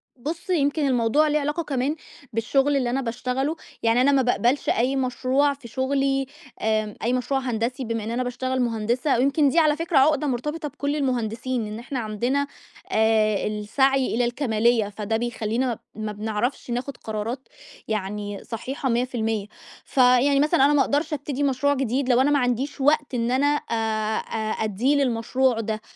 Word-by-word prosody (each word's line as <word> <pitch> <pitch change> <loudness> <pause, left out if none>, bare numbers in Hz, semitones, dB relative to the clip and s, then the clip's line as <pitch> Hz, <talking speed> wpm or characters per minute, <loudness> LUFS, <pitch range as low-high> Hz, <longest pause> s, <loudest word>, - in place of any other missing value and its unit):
بُص، 320 - -6
يمكن 290 -3 +1
الموضوع 255 +5 +3
ليه 300 0 +2
علاقة 295 +4 -2
كمان 280 0 -1 0.4
بالشُغل 270 +5 +2
اللي 250 -3 0
أنا 265 +2 0
باشتغله، 255 +5 -2 0.3
يعني 230 +2 +3
أنا 280 +2 +4
ما 270 -1 +4
بأقبلش 245 +2 +1
أي 250 +4 +1
مشروع 265 +2 +1
في 275 -4 -12
شُغلي 270 +2 0 0.4
آآ 215 -1 0
أي 240 - +1
مشروع 260 +2 0
هندسي 250 +1 -2
بما 230 -2 -3
إن 225 - -4
أنا 250 +2 -1
باشتغل 255 +1 -2
مهندسة 235 +3 0
ويمكن 280 +3 +3
دي 330 - +3
على 305 -2 +4
فكرة 330 -1 0
عُقدة 300 +2 +4
مُرتبطة 300 +5 -2
بكل 285 +1 -3
المهندسين 245 -3 -1
إن 215 +1 -6
إحنا 260 +2 -4
عندنا 240 +6 -1 0.4
آآ 220 -2 +2
السعي 255 +5 +1
إلى 245 - +2
الكَمالية، 235 -3 +1
فده 210 +2 -2
بيخلّينا 235 +1 -2 0.2
ما 215 0 -4
بنعرفش 220 +5 -3
ناخُد 250 +2 -3
قرارات 225 +4 -5 0.4
يعني 205 -1 -3
صحيحة 260 +4 -4
100%، 225 -4 -1 0.4
فيعني 260 +2 +4
مثلًا 300 -1 +4
أنا 290 - +4
ما 290 - +4
أقدرش 300 +2 0
أبتدي 285 -1 -3
مشروع 280 +1 +2
جديد 265 0 -1
لو 250 +1 +5
أنا 290 +2 +3
ما 285 - +3
عنديش 255 +3 -1
وقت 295 0 +2
إن 235 0 0
أنا 270 +3 +2 0.2
آآ - - +1 0.4
آآ 220 -1 -3
أدّيه 220 +7 +1
للمشروع 250 -2 +1
ده، 215 -1 -3
255 Hz, 165 wpm, -24 LUFS, 225-280 Hz, 0.4 s, لو